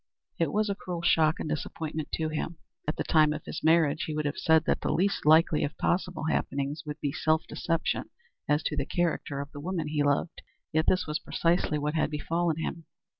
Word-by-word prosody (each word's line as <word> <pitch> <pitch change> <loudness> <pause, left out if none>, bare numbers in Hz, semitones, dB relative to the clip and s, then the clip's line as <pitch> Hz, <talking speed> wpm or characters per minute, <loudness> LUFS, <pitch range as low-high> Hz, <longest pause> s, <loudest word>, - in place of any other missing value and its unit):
It 165 -4 +1
was 215 +1 +1
a 200 - 0
cruel 180 -3 -6
shock 160 -2 +3
and - - -3
disappointment 155 0 -4
to 160 -1 0
him. 160 +2 -3 0.3
At 155 - 0
the - - -2
time 155 -2 +4
of - - -7
his - - -6
marriage 160 -2 +3
he 155 - -4
would 155 0 -1
have 145 - -1
said 160 0 +4
that - - +1
the - - 0
least 190 -3 0
likely 160 0 +5
of 145 - -3
possible 180 -1 0
happenings 145 -1 -1
would 150 +1 -5
be 145 - 0
self 155 +2 +1
deception 165 -1 -1 0.4
as 150 +1 +2
to 150 - -1
the 140 -2 -1
character 165 -5 -1
of 140 +1 -8
the 145 - -8
woman 170 -2 -2
he 150 -1 0
loved. 145 +3 0 0.3
Yet 155 +1 +2
this 185 - +3
was 150 0 -2
precisely 165 -2 +1
what 150 +1 -1
had 160 - +1
befallen 165 +2 -1
him. 165 0 -4
155 Hz, 215 wpm, -28 LUFS, 150-165 Hz, 0.4 s, likely